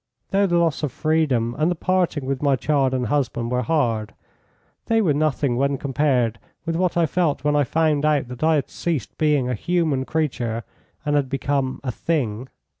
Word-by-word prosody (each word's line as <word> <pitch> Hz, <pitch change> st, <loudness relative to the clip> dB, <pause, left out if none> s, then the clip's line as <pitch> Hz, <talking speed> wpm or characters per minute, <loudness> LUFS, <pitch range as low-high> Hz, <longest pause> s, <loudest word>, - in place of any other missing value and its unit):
Though 200 Hz, +1 st, +3 dB
the 175 Hz, -1 st, +2 dB
loss 165 Hz, -3 st, +1 dB
of 150 Hz, -4 st, -1 dB
freedom 140 Hz, -7 st, +1 dB
and 155 Hz, +2 st, +3 dB
the 180 Hz, -, 0 dB
parting 175 Hz, -5 st, 0 dB
with 135 Hz, 0 st, -2 dB
my 140 Hz, -2 st, +3 dB
child 135 Hz, -1 st, +1 dB
and 125 Hz, -1 st, -1 dB
husband 120 Hz, -2 st, -1 dB
were 125 Hz, 0 st, +1 dB
hard, 115 Hz, -6 st, 0 dB, 0.7 s
they 225 Hz, 0 st, +3 dB
were 180 Hz, -9 st, +3 dB
nothing 140 Hz, -4 st, 0 dB
when 140 Hz, +1 st, +1 dB
compared 130 Hz, -5 st, 0 dB, 0.3 s
with 165 Hz, -1 st, -1 dB
what 180 Hz, 0 st, 0 dB
I 170 Hz, -, +4 dB
felt 160 Hz, -5 st, 0 dB
when 150 Hz, 0 st, +2 dB
I 145 Hz, -, +4 dB
found 150 Hz, +2 st, +1 dB
out 150 Hz, -4 st, +2 dB
that 125 Hz, +3 st, -6 dB
I 160 Hz, 0 st, +4 dB
had 145 Hz, -, -1 dB
ceased 160 Hz, -, -3 dB
being 150 Hz, -5 st, +2 dB
a 125 Hz, -, -1 dB
human 155 Hz, 0 st, 0 dB
creature 125 Hz, -8 st, -2 dB, 0.4 s
and 145 Hz, 0 st, +1 dB
had 140 Hz, -3 st, +1 dB
become 135 Hz, -1 st, -1 dB
a 130 Hz, -, -2 dB
thing. 125 Hz, -5 st, -2 dB
145 Hz, 190 wpm, -22 LUFS, 125-160 Hz, 0.7 s, I